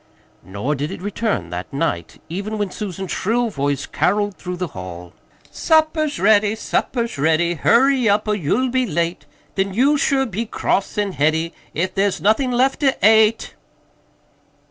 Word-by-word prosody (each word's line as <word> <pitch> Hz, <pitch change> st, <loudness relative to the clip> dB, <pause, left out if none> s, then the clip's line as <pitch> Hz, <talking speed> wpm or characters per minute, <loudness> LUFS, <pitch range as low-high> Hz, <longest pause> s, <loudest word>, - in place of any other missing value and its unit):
Nor 100 Hz, +10 st, -3 dB
did 145 Hz, +1 st, -3 dB
it -, -, -7 dB
return 200 Hz, -, -2 dB
that 90 Hz, +1 st, -6 dB
night, 85 Hz, -11 st, -3 dB
even 200 Hz, +6 st, -4 dB
when 205 Hz, -3 st, -2 dB
Susan's 195 Hz, -3 st, -5 dB
shrill 235 Hz, +3 st, 0 dB
voice 140 Hz, -3 st, -1 dB
caroled 205 Hz, +1 st, 0 dB
through 180 Hz, 0 st, -6 dB
the 180 Hz, -2 st, -3 dB
hall: 90 Hz, -4 st, -9 dB, 0.4 s
"Supper's 315 Hz, -2 st, +1 dB
ready, 210 Hz, +1 st, +4 dB
supper's 230 Hz, -, -2 dB
ready, 160 Hz, +3 st, +2 dB
Hurry 250 Hz, -, +3 dB
up, 210 Hz, +1 st, +1 dB
or 210 Hz, -, +2 dB
you'll 210 Hz, -, 0 dB
be 255 Hz, 0 st, 0 dB
late, 170 Hz, 0 st, -2 dB, 0.3 s
Then 195 Hz, 0 st, -1 dB
you'll 280 Hz, +6 st, +3 dB
sure 275 Hz, -1 st, +2 dB
be 225 Hz, 0 st, -4 dB
cross 195 Hz, -1 st, -1 dB
and 205 Hz, -2 st, -1 dB
heady 160 Hz, +3 st, 0 dB, 0.2 s
If 185 Hz, +4 st, -1 dB
there's 195 Hz, -2 st, 0 dB
nothin' 220 Hz, -, +2 dB
left 255 Hz, +2 st, +2 dB
to 275 Hz, -2 st, +2 dB
ate." 220 Hz, +1 st, +4 dB
200 Hz, 155 wpm, -20 LUFS, 160-230 Hz, 0.4 s, ready